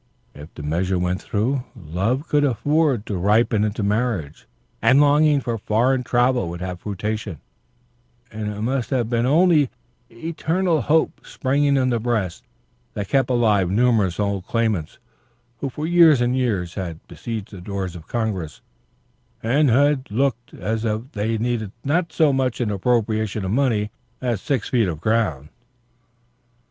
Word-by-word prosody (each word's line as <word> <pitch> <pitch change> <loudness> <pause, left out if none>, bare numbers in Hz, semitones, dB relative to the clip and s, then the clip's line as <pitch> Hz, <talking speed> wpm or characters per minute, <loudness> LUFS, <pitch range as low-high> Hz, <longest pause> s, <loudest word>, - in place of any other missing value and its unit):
If 75 +2 -11
the 75 - -8
measure 90 +5 0
went 90 +1 -1
through, 125 +6 -1
love 100 - -2
could 145 -1 +2
afford 145 -2 +1
to 100 - -3
ripen 105 +2 +3
into 105 0 -1
marriage, 105 -7 -1 0.3
and 130 +2 +5
longing 145 0 +4
for 115 -3 -3
foreign 125 +6 +1
travel 125 -5 +1
would 85 +1 -6
have 90 -1 -5
fruition; 105 -3 -4 0.9
and 110 -1 -4
it 105 0 -6
must 125 +2 -1
have 125 -4 -1
been 120 +1 +1
only 155 -2 +4 0.4
eternal 165 +5 -1
hope 160 +6 +1
springing 140 +1 +1
in 130 -1 +2
the 120 - +1
breast 105 -7 -2 0.5
that 100 -2 -4
kept 135 -1 +2
alive 110 -7 +2
numerous 105 -4 +2
old 100 -2 -1
claimants 110 -9 -1 0.6
who 140 - -2
for 150 +4 -5
years 165 -4 +6
and 120 +1 +1
years 105 -10 -1
had 85 -5 -6
besieged 110 -4 -6
the 95 -3 -9
doors 95 -1 -4
of 80 -2 -11
Congress, 100 - -3 0.8
and 135 +6 +3
who 145 +5 +4
looked 120 +2 -1
as 110 +4 -2
if 115 +4 -2
they 110 +2 -1
needed 110 -3 -2
not 165 +4 0
so 155 -3 +3
much 130 -2 0
an 115 -4 0
appropriation 110 -1 0
of 95 - -2
money 110 -4 +1 0.3
as 120 -6 -2
six 135 -7 -1
feet 115 -5 +2
of 80 -4 -4
ground. 85 -9 0
115 Hz, 155 wpm, -22 LUFS, 100-130 Hz, 0.9 s, years